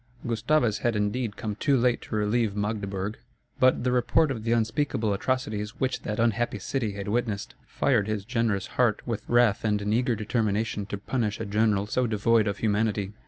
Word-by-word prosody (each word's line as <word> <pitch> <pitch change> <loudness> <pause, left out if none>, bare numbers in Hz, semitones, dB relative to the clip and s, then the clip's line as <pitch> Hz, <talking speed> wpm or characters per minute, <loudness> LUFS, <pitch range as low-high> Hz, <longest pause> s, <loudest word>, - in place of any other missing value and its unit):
Gustavus 120 0 +1
had, 120 -2 0
indeed, 105 +1 -1
come 110 -3 -3
too 135 +6 +2
late 125 0 +2
to - - -6
relieve 105 0 +1
Magdeburg, 105 -1 -3 0.4
but 130 -2 +4
the 125 - +1
report 135 +5 +3
of 115 -5 -4
the 115 - -1
unspeakable 115 -1 +1
atrocities 105 -2 -2
which 130 -1 -1
that 105 - -4
unhappy 115 -1 +1
city 110 +1 -2
had 100 0 -6
witnessed, 110 -2 -2
fired 115 -7 +1
his 105 -2 -2
generous 115 -5 0 0.2
heart 115 -4 +2
with 115 -3 -3
wrath 120 -4 +3
and 105 -2 +1
an 105 +1 -1
eager 120 +1 +2
determination 105 -1 -1
to 100 - -4
punish 105 0 -2
a 110 - -3
general 105 -1 +1
so 125 +4 0
devoid 110 0 +2
of 100 -1 -1
humanity. 105 -2 0
110 Hz, 180 wpm, -27 LUFS, 105-120 Hz, 0.4 s, but